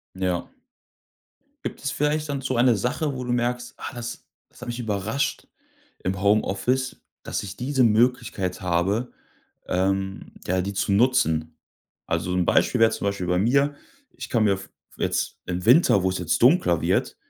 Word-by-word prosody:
Ja. 90 -2 -2 1.1
Gibt - - -5
es 140 - -2
vielleicht 150 +1 0
dann 140 -1 -2
so 130 -1 -2
eine 120 -1 +4
Sache, 130 +7 -1
wo 125 -1 -5
du 125 - -2
merkst: 120 0 -1
„Ah, - - -7
das 120 0 -7 0.2
das - - -20
hat - - -8
mich 120 +1 -4
überrascht 110 +4 -2 0.6
im 95 +1 -1
Homeoffice, 110 +5 +1 0.2
dass - - -3
ich 95 -2 -7
diese 130 +1 +1
Möglichkeit 115 -5 +1
habe, 95 +7 0 0.5
ähm, 95 +1 -1
ja, 95 +1 +1
die 100 +2 -3
zu 100 - 0
nutzen.“ 100 -9 +2 0.5
Also, 90 - -1
'n 90 -1 +2
Beispiel 125 - +2
wäre 115 0 +6
zum - - -3
Beispiel 100 -2 -2
bei 90 0 +2
mir. 140 +8 +2 0.3
Ich 125 -1 -9
kann 115 -2 +2
mir 100 -2 +2
v 95 - -11 0.3
jetzt - - -1
im 90 0 -3
Winter, 120 - +5
wo 95 - +2
es 95 - -2
jetzt 90 - -1
dunkler 120 - +4
wird, - - 0
110 Hz, 170 wpm, -24 LUFS, 95-125 Hz, 1.1 s, wäre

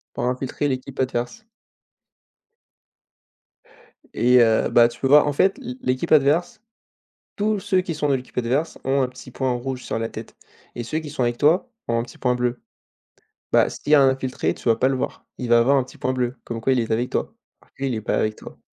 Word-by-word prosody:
pour - - -2
infiltrer 130 +3 -2
l'équipe 130 0 -4
adverse. 130 - -3 2.7
Et 125 +1 +5
heu, 110 -1 +3
bah, 120 0 +5
tu 120 0 -13
peux 135 - 0
voir 150 +2 +6
en 145 - +1
fait 190 - +2
l'é 255 -1 -7
l'équipe 130 - -1
adverse, 155 - +3 0.8
tous 210 -1 0
ceux 190 -2 +1
qui 170 -2 -4
sont 150 -1 -1
dans 140 - +3
l'équipe 130 -1 -6
adverse, 130 +7 -1
ont 135 +1 +2
un 130 - 0
petit 130 0 -12
point 130 +1 -2
en 125 - -1
rouge 130 +1 -5
sur - - -3
la 115 - -2
tête - - -10 0.4
et 120 - -5
ceux 155 +7 -2
qui 150 -2 -8
sont 145 -3 -2
avec 120 0 0
toi, 170 - +2 0.2
ont 115 0 0
un - - 0
petit 120 - -11
point 125 -1 +1
bleu. 125 0 -1 0.9
Bah, - - +4
s'il 145 - -5
y - - +10
a 140 - +6
un 135 - +6
infiltré, 130 -1 -1
tu - - -8
vas 115 - +5
pas 130 +4 +2
le 135 - 0
voir, - - -5
il 125 - -4
va 120 0 +6
avoir 135 +4 +4
un 135 - +2
petit - - -15
point 130 - -1
bleu, 125 0 -1
comme 115 -1 -5
quoi 130 +4 +2
il 125 - +1
est 115 - -4
avec 120 +3 0
toi, - - -2 0.3
en - - -25
vrai 135 0 -2
il 120 - -1
est 110 - -4
pas - - -1
avec 110 0 0
toi. - - -13
130 Hz, 235 wpm, -22 LUFS, 120-145 Hz, 2.7 s, y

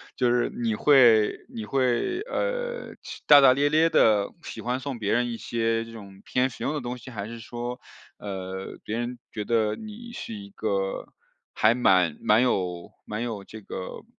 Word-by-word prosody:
就 125 -2 +2
是 120 -1 +2
你 115 -2 -2
会 115 -4 +5
你 110 -2 -5
会， 135 - 0
呃， - - -3
是 - - -9
大 145 -1 +9
大 130 -1 +7
咧 145 +2 +2
咧 160 +2 +4
地 105 -2 +4
喜 - - -8
欢 125 +2 -1
送 135 -2 -5
别 105 -2 -1
人 120 +1 +2
一 115 - -4
些 115 -1 -1
这 115 - -12
种 100 -3 -11
偏 130 +1 +1
实 - - -9
用 - - 0
的 150 - -3
东 125 +1 -4
西？ 130 +1 -11
还 105 -2 -5
是 115 0 -8
说， 120 +2 -6 0.4
呃， 95 -1 -6
别 110 +2 -3
人 120 0 -4
觉 105 - -4
得 110 -2 +1
你 225 +2 -9
是 115 - -6
一 100 -1 -8
个 100 -2 -2 0.5
还 110 +2 +4
蛮 90 -9 +3
蛮 110 +3 +4
有 90 -8 -1
蛮 105 +2 -4
有 110 -5 -4
这 110 +1 -11
个， 95 -1 -7
115 Hz, 205 characters per minute, -26 LUFS, 105-130 Hz, 0.5 s, 大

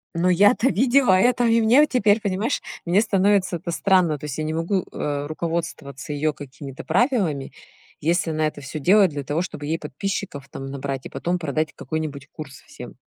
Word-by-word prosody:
Но 175 +2 +2
я-то 205 +7 +4
видела 250 +2 +3
это, 245 +6 +3
и 230 0 +4
мне 235 +6 +5
у - - +6
теперь, 215 -4 +2
понимаешь, 205 +6 -1 0.2
мне 180 +4 +3
становится 195 -3 +2
это 170 +1 -5
странно. 175 -4 +2
То 150 - -8
есть 145 -1 -5
я 155 - -2
не 155 +1 -2
могу, 170 +3 -1
э, 145 -1 -3
руководствоваться 155 -4 -4
её 150 +1 0
какими-то 140 -1 -9
правилами, 200 - 0 0.5
если 165 +2 0
она 155 0 0
это 150 -1 -4
всё 140 +3 -6
делает 190 +5 +5
для 145 -1 -5
того, 145 +4 -1
чтобы 150 -5 -6
ей 160 +2 -1
подписчиков 150 -1 -5
там 135 - -7
набрать, 135 -1 -5
и - - -6
потом 175 +1 -2
продать 155 -1 -2
какой-нибудь 145 -1 -5
курс 145 -4 -10
всем. 125 - -10
165 Hz, 190 wpm, -23 LUFS, 145-200 Hz, 0.5 s, у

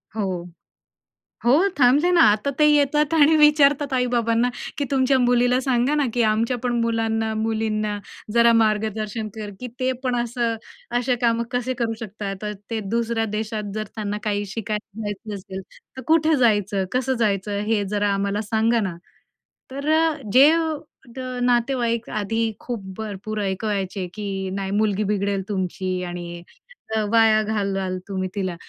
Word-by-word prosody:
हो, 215 - -1 1.2
हो, 240 - +5 0.3
थांबले 275 +8 +5
ना 345 -2 +5
आता. 215 +7 0
ते 300 - +6
येतात 295 +1 +3
आणि 315 0 +5
विचारतात 290 -2 +4
आई-बाबांना 240 -1 +1 0.3
की 285 - 0
तुमच्या 265 0 +3
मुलीला 245 0 +3
सांगा 260 +2 +1
ना, 290 - +2
की 240 - +1
आमच्या 230 +3 +1
पण 245 - 0
मुलांना, 225 -1 0
मुलींना 215 -1 -1 0.4
जरा 235 0 +6
मार्गदर्शन 215 0 -1
कर, 210 -2 -6
की 250 - -5
ते 255 0 +1
पण 250 -1 0
असं 235 -1 -1 0.4
असे 250 0 +1
काम 230 -1 +2
कसे 250 +1 -1
करू 225 -1 0
शकतात? 200 -2 -6
अ, 210 - -2 0.2
ते 225 -1 -2
दुसऱ्या 230 -1 0
देशात 215 -1 -3
जर 215 - -1
त्यांना 210 -1 -3
काही 205 -1 -1
शिकायला 215 0 -5
जायचं 205 0 -5
असेल, 190 0 -7 0.4
तर 260 - -5
कुठे 320 -1 +4
जायचं? 205 -3 +2
कसं 260 +1 +1
जायचं? 200 0 0
हे 210 -2 +2
जरा 205 0 +1
आम्हाला 200 +1 -1
सांगा 225 +1 +3
ना? 170 - -8 0.8
तर 280 +3 -3
अ, 320 -1 +3 0.2
जे 280 +4 +8 0.6
द - - -6 0.2
नातेवाईक 240 -1 +1
आधी 215 +2 -1 0.2
खूप 235 -5 -5
भरपूर 215 0 -5
ऐकवायचे 195 -1 -2
की, 210 -1 -5 0.3
"नाही, 195 0 -3
मुलगी 215 -1 +1
बिघडेल 200 -1 0
तुमची 185 -1 -2
आणि 175 -1 -6 0.7
वाया 225 -1 +5
घालवाल 195 -3 -1
तुम्ही 190 -1 -3
तिला," 185 -3 -2
225 Hz, 150 wpm, -23 LUFS, 205-245 Hz, 1.2 s, जे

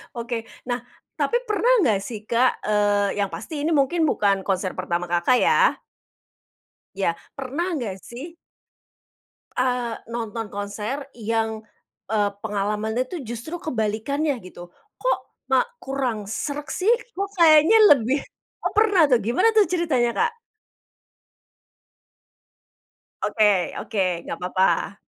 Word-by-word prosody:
Oke, 235 -1 -3 0.2
nah, 245 0 -2 0.3
tapi 480 +1 +1
pernah 425 +3 +1
enggak 220 - +3
sih 220 -4 -6
Kak, 245 +2 +2
eee, 205 -1 +2
yang 200 -1 -1
pasti 300 -3 -5
ini 330 - +1
mungkin 310 +4 +2
bukan 200 -9 +1
konser 185 -1 -1
pertama 175 -1 -2
Kakak 175 +8 +3
ya. - - +3 1.1
Ya, 180 -4 0 0.2
pernah 285 +7 -3
enggak 235 - -3
sih 295 +8 -9 1.2
eee, 250 -2 0 0.2
nonton 225 -1 -4
konser 210 +7 -4
yang, 225 -1 -2 0.5
eee, 205 -2 +2
pengalamannya 210 +3 -1
tuh 350 -4 -4
justru 240 +9 -6
kebalikannya 255 +3 -1
gitu? 175 -1 -12 0.2
Kok - - +1 0.3
ma 265 - +5 0.2
kurang 260 -6 -2
sreg 285 +8 -4
sih, 400 +5 +2 0.2
kok 395 0 -3
kayaknya 325 +5 +7 0.2
lebih 260 +3 0 0.4
oh - - 0
pernah 410 -6 +5
tuh, 245 - +5
gimana 245 - +3
tuh 430 -2 +5
ceritanya 315 -9 +1
Kak? 465 +1 +2 2.9
Oke 215 - +2 0.3
oke, 220 - -5 0.3
nggak 170 - -4
apa-apa. 190 +2 0
240 Hz, 120 wpm, -23 LUFS, 210-305 Hz, 2.9 s, kayaknya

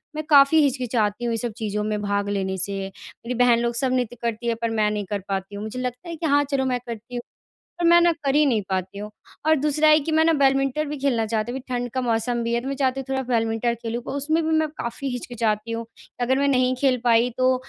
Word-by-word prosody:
मैं 310 - -3
काफ़ी 285 +1 +7
हिचकिचाती 240 -5 0
हूँ 235 - 0
ये - - -1
सब 240 0 -3
चीज़ों 210 -1 -2
में 210 0 -2
भाग 200 0 -1
लेने 190 -1 -2
से। 195 +2 -2
मेरी 235 +4 -9
बहन 240 -1 +4
लोग 235 0 -1
सब 255 +1 +1
नृत्य 245 -2 -1
करती 235 0 -3
हैं 230 - +1
पर 230 - 0
मैं 215 -2 +1
नहीं 210 -1 -3
कर 205 - -1
पाती 195 +1 -3
हूँ। 205 - -5
मुझे 220 +4 -5
लगता 250 +6 -5
है 335 - -4
कि 325 +1 -5
हाँ, 290 -1 +4
चलो 275 -2 -1
मैं 250 -1 0
करती 235 +1 -7
हूँ, 240 - -2 0.6
पर 345 - -2
मैं 345 0 +7
ना 345 0 +5
कर 275 -1 +1
ही 300 +1 +5
नहीं 230 -6 +1
पाती 190 +1 -3
हूँ। 210 +1 -6 0.4
और 315 - +6
दूसरा 300 +1 +2
है 305 0 +7
कि 315 +2 -3
मैं 315 +1 +4
ना 330 - +4
बैडमिंटन 275 0 +2
भी 295 - -4
खेलना 260 -5 +1
चाहती 220 +1 -2
हूँ 265 - -4
कि - - -20
ठंड 245 0 -2
का 260 - -1
मौसम 240 0 0
भी 230 0 -2
है। 235 - +1
तो 260 - -6
मैं 275 - -2
चाहती 265 -1 0
हूँ - - -6
थोड़ा 265 0 -1
बैडमिंटन 235 -1 0
खेलूँ, 235 +1 -3
पर - - -6
उसमें 310 +4 +1
भी 320 - 0
मैं 315 0 +1
काफ़ी 235 +4 -4
हिचकिचाती 230 -3 -2
हूँ। 230 0 -3 0.4
अगर 255 +2 +2
मैं 280 - +2
नहीं 255 -1 +2
खेल 265 -2 +3
पाई 235 0 +4
तो 255 0 +4
245 Hz, 265 wpm, -23 LUFS, 225-275 Hz, 0.6 s, काफ़ी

